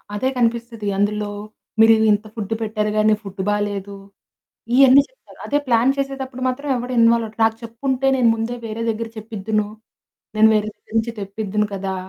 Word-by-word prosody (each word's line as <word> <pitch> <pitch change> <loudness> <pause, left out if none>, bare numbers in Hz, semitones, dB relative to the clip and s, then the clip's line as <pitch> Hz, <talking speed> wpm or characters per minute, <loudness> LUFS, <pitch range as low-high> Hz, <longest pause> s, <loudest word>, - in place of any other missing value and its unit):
అదే 260 +6 0
కనిపిస్తది. 235 -2 -1
అందులో 205 +1 0 0.5
మీరు 225 0 +8 0.2
ఇంత 205 +1 +1
ఫుడ్ 220 -1 -3
పెట్టారు 215 -1 -1
గానీ 215 0 +4
ఫుడ్ 195 -1 -6
బాలేదు. 205 -1 -2 0.8
ఇయన్నీ 270 +1 +7
చెప్తారు. - - -20
అదే 290 - +1
ప్లాన్ 240 +2 +4
చేసేటప్పుడు 270 -2 -4
మాత్రం 270 +3 -3
ఎవడు 245 +1 -4
ఇన్వాల్వవ్వరు. 230 -1 +3
"నాకు 225 0 +3
చెప్పుంటే 260 +3 -2
నేను 245 -3 +4
ముందే 225 +2 -3
వేరే 220 +1 -5
దగ్గర 225 +1 -2
చెప్పిద్దును. 215 -1 -2 0.7
నేను 220 +1 +6
వేరే 215 0 +1
దగ్గరించి 225 +2 -2
తెప్పిద్దును 205 +1 -2
కదా!" 195 0 -3
225 Hz, 150 wpm, -21 LUFS, 210-245 Hz, 0.8 s, మీరు